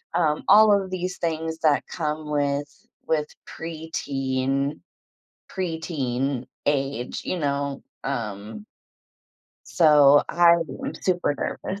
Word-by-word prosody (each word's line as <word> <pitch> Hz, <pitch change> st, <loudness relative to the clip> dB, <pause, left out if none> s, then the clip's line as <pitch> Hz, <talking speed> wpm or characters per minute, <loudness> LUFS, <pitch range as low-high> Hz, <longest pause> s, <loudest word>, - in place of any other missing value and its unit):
um, 155 Hz, -3 st, +1 dB
all 215 Hz, +1 st, +7 dB
of 195 Hz, -2 st, +1 dB
these 185 Hz, 0 st, -3 dB
things 160 Hz, -1 st, -2 dB
that 155 Hz, -3 st, +2 dB
come 155 Hz, -2 st, -4 dB
with 145 Hz, 0 st, 0 dB, 0.4 s
with 150 Hz, -2 st, +1 dB, 0.2 s
preteen 140 Hz, -, -3 dB, 0.7 s
preteen 140 Hz, -8 st, -2 dB, 0.2 s
age, 135 Hz, -3 st, -1 dB
you 185 Hz, -, -2 dB
know, 140 Hz, -2 st, -2 dB, 0.2 s
um 110 Hz, -, -5 dB, 1.0 s
So, 145 Hz, -3 st, +6 dB
I 170 Hz, 0 st, +5 dB, 0.3 s
am 270 Hz, +1 st, -5 dB
super 175 Hz, -5 st, +1 dB
nervous. 190 Hz, +6 st, -4 dB
150 Hz, 100 wpm, -24 LUFS, 140-170 Hz, 1.0 s, all